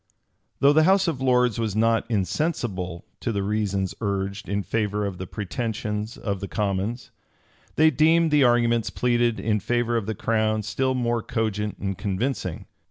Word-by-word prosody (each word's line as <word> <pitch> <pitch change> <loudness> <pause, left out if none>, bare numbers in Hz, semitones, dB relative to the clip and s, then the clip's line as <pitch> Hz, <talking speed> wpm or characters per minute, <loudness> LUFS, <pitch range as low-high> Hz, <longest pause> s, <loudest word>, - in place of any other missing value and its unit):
Though 140 +1 +6
the 155 +1 +5
house 190 +1 +4
of 150 -6 -2
lords 125 -3 +2
was 110 -3 -1
not 115 +2 +2
insensible 100 - -2
to 120 - -2
the 100 -2 -1
reasons 100 -2 -1
urged 100 -1 -2
in 100 0 -1
favor 105 -1 -1
of 95 -3 -5
the 95 - -5
pretensions 105 +1 -4
of 100 -2 -3
the 100 - -5
commons, 105 +4 -2 0.6
they 155 +1 +5
deemed 160 +3 +4
the 150 -2 +5
arguments 120 -2 +3
pleaded 120 -2 +1
in 105 -1 0
favor 120 +3 0
of 110 -3 -1
the 110 - -2
crown 110 0 0
still 130 +5 0
more 120 -2 0
cogent 105 -3 -2
and 95 -2 -4
convincing. 100 - -2
110 Hz, 165 wpm, -24 LUFS, 100-120 Hz, 0.6 s, Though